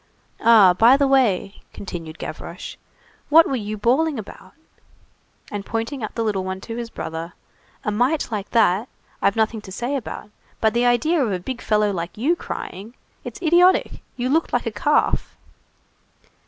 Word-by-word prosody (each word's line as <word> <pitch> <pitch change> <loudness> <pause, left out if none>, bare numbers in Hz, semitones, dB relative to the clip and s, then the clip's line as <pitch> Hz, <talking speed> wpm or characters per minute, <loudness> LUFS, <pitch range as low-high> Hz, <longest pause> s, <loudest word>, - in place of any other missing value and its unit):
"Ah, 220 -5 +7
by 230 +8 +6
the 280 -1 +2
way," 220 -7 +1
continued 165 -4 -7
Gavroche, - - -7 0.5
"what 325 +2 +7
were 270 - -1
you 215 -2 -4
bawling 270 +8 +1
about?" 215 - -10 1.0
And 205 -1 -4
pointing 230 +6 -4
out 215 - -5
the 230 - -1
little 205 -4 -1
one 190 0 -4
to 230 - -7
his 235 -1 -5
brother:— 165 -4 -6 0.5
"A 210 - 0
mite 245 +7 0
like 210 -2 -4
that, 225 0 +2 0.3
I've 200 - +2
nothing 220 0 0
to 190 - -11
say 245 +8 -3
about, 220 -4 -6 0.3
but 220 -1 +2
the 240 +1 +2
idea 280 +6 +2
of 225 - -1
a 185 - 0
big 255 +7 -6
fellow 210 -1 +2
like 170 +1 -5
you 290 +10 +2
crying! 220 - -7 0.3
It's - - -8
idiotic; 355 +3 +3 0.2
you 245 0 -1
looked 320 +5 +1
like 245 - 0
a 230 - -2
calf." 290 +8 0
225 Hz, 170 wpm, -22 LUFS, 205-265 Hz, 1.0 s, Ah